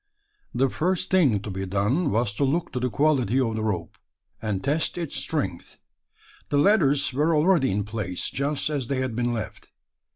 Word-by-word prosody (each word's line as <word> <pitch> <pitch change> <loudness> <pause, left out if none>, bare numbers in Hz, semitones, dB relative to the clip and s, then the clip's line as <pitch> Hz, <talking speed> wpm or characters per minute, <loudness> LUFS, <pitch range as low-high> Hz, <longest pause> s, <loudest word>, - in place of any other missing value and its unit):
The 135 - +3
first 180 +8 -1
thing 140 - +3
to 105 - -6
be 95 0 -4
done, 105 - +1
was 115 -3 0
to 140 - -1
look 155 +6 0
to 125 - -3
the 125 +1 0
quality 130 -2 +2
of 115 -4 0
the 110 - -2
rope, 90 -6 -3 0.4
and 105 -3 -2
test 150 +5 0
its 170 -4 -3
strength. - - -3 0.7
The 145 - +1
ladders 145 -6 +3
were 155 +5 +2
already 155 -2 +3
in 100 +1 0
place, 105 -4 -4
just 140 +2 -1
as 140 -5 -2
they 135 - -1
had 130 -3 -2
been 120 0 0
left. 115 -2 -6
130 Hz, 185 wpm, -25 LUFS, 110-150 Hz, 0.7 s, The